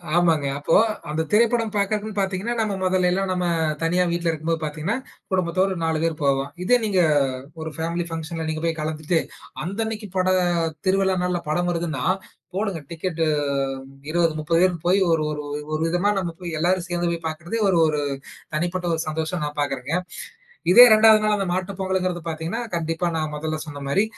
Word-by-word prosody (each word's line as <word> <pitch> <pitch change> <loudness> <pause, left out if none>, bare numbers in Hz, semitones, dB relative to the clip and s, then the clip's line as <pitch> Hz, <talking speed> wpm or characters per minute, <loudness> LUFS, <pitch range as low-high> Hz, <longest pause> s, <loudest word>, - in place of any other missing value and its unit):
க 170 - -12
ஆமாங்க. 165 -5 +3
அப்போ 145 +3 +1 0.4
அந்தத் 160 +1 -2
திரைப்படம் 230 0 +3
பாக்கறதுன்னு 210 +1 -1
பாத்தீங்கன்னா, 195 +4 -1
நம்ம 220 -2 +1
மொதல்லைல்லாம் 185 +1 +1
நம்ம 180 -1 0 0.4
தனியா 175 +2 +2
வீட்ல 170 0 -1
இருக்கும்போது 160 +1 -2
பாத்தீங்கன்னா 155 +9 -2 0.3
குடும்பத்தோடு 185 +1 +1
4 160 -1 0
பேரு 165 -1 +1
போவோம். 140 0 +1
இதே 245 +6 +5
நீங்க 200 -4 +2 0.6
ஒரு 160 - -4
பேமலி 170 +2 -1
பங்சன்ல 165 0 -4
நீங்க 155 0 -3
போய் 165 -1 0
கலந்துட்டு 155 +2 0 0.5
அந்த 195 +5 -5
அன்னைக்கி 220 -1 -5
பட 185 0 +2 0.6
திருவிழா 190 0 +3
நாள்ல 180 -1 0
படம் 175 +3 +1
வருதுன்னா, 165 -6 -2 0.5
போடுங்க 195 -5 -1
டிக்கெட்டு! 165 0 -2 0.8
20, 170 0 +2
30 165 +2 +1
பேரு 185 -1 +4
போயி 180 +3 +4
ஒரு 160 -1 +2
ஒரு 150 - -3 0.3
ஒரு 155 - -1
விதமா 175 +5 +2
நம்ம 180 -3 -2
போய் 175 -1 -5
எல்லாரும் 180 +2 +1
சேந்து 175 -1 -1
போய் 170 - -1
பாக்றது 160 +5 -4
ஒரு 185 - +3
ஒரு 150 -1 0 0.5
தனிப்பட்ட 175 +3 -1
ஒரு 160 - -2
சந்தோஷமா 160 +3 -2
நான் 150 0 -5
பாக்றங்க. 140 +1 -2 0.8
இதே 240 +7 +11
2து 220 0 +7
நாள் 215 0 +3
அந்த 195 - -1
மாட்டுப் 185 +1 -3
பொங்கல்ங்குறது 185 -2 -1
பாத்தீங்கன்னா 165 +7 -3
கண்டிப்பா 165 +1 -1
நான் 155 -1 -2
மொதல்ல 155 +1 -3
சொன்ன 145 -2 -8
மாரி 195 +9 +2
175 Hz, 170 wpm, -23 LUFS, 160-190 Hz, 0.8 s, இதே